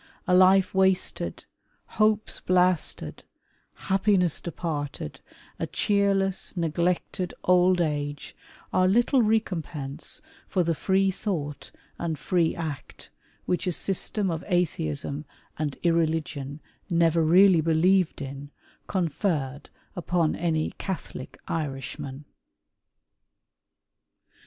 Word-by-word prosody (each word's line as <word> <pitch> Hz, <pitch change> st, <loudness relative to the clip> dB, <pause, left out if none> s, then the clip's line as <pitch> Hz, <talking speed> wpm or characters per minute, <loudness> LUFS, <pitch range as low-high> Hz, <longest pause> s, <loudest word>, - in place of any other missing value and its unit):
A 180 Hz, -, +2 dB
life 185 Hz, +1 st, +5 dB
wasted, 190 Hz, -1 st, +1 dB, 0.4 s
hopes 215 Hz, 0 st, +1 dB
blasted, 180 Hz, -2 st, +1 dB, 0.5 s
happiness 190 Hz, -3 st, +1 dB
departed, 150 Hz, -, -4 dB, 0.4 s
a -, -, -2 dB
cheerless, 195 Hz, -2 st, 0 dB
neglected, 175 Hz, +2 st, -1 dB
old 180 Hz, 0 st, +4 dB
age, 145 Hz, -3 st, -2 dB, 0.4 s
are 185 Hz, 0 st, +4 dB
little 240 Hz, +6 st, +3 dB
recompense 165 Hz, -, -2 dB, 0.3 s
for 185 Hz, -, +1 dB
the 165 Hz, 0 st, +1 dB
free 190 Hz, +4 st, +2 dB
thought 160 Hz, -8 st, -4 dB, 0.3 s
and 165 Hz, -2 st, -2 dB
free 170 Hz, -1 st, +1 dB
act 155 Hz, -4 st, -7 dB, 0.3 s
which 180 Hz, +1 st, -1 dB
a -, -, +2 dB
system 195 Hz, +2 st, +1 dB
of 160 Hz, -1 st, -4 dB
Atheism 150 Hz, -, -1 dB, 0.4 s
and 150 Hz, -3 st, -2 dB
irreligion, 155 Hz, -4 st, 0 dB, 0.3 s
never 170 Hz, -1 st, +3 dB
really 180 Hz, +1 st, +6 dB
believed 165 Hz, +1 st, +2 dB
in, 140 Hz, +1 st, -7 dB, 0.4 s
con 185 Hz, -4 st, 0 dB
ferred 145 Hz, -5 st, -2 dB, 0.3 s
upon 175 Hz, -2 st, 0 dB
any 160 Hz, -2 st, 0 dB
Catholic 180 Hz, -8 st, -6 dB
Irishman. 140 Hz, -1 st, -4 dB
170 Hz, 95 wpm, -26 LUFS, 155-190 Hz, 0.5 s, really